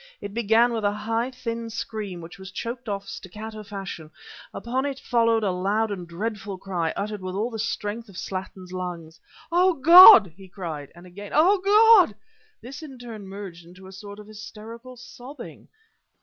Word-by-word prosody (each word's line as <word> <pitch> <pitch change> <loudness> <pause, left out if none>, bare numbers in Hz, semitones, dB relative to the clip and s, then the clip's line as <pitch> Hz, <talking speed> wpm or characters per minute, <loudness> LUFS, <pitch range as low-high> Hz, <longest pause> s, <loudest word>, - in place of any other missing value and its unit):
It 200 0 -8
began 235 +1 +3
with 225 -2 -3
a 205 - +2
high, 225 +4 -2
thin 230 -3 -5
scream, 215 -5 -6
which 170 +4 -12
was 190 0 -9
choked 235 +4 -6
off 200 -1 -4
staccato 215 +3 -8
fashion; 195 -6 -8 0.4
upon 255 +3 -3
it 275 -1 -4
followed 230 -2 +1
a 195 - +1
loud 205 +4 -1
and 180 -4 -6
dreadful 205 +2 -5
cry 180 -3 -3
uttered 210 0 -4
with 185 0 -5
all 220 +5 -2
the 225 - -6
strength 220 0 -4
of 190 - -13
Slattin's 185 -1 -7
lungs 170 -3 -6 0.3
"Oh, 360 +2 +4
God!" 285 - +9
he 190 0 -14
cried, 160 -7 -7
and 175 +1 -14
again 200 +3 -10
"Oh, 365 +7 +4
God!" 410 - +6 0.5
This 260 +5 -9
in 280 -5 -10
turn 225 -5 -9
merged 190 -3 -9
into 180 +3 -15
a 190 - -11
sort 200 +1 -10
of 210 - -11
hysterical 225 +4 -11
sobbing. 250 +3 -12
210 Hz, 175 wpm, -24 LUFS, 190-235 Hz, 0.5 s, God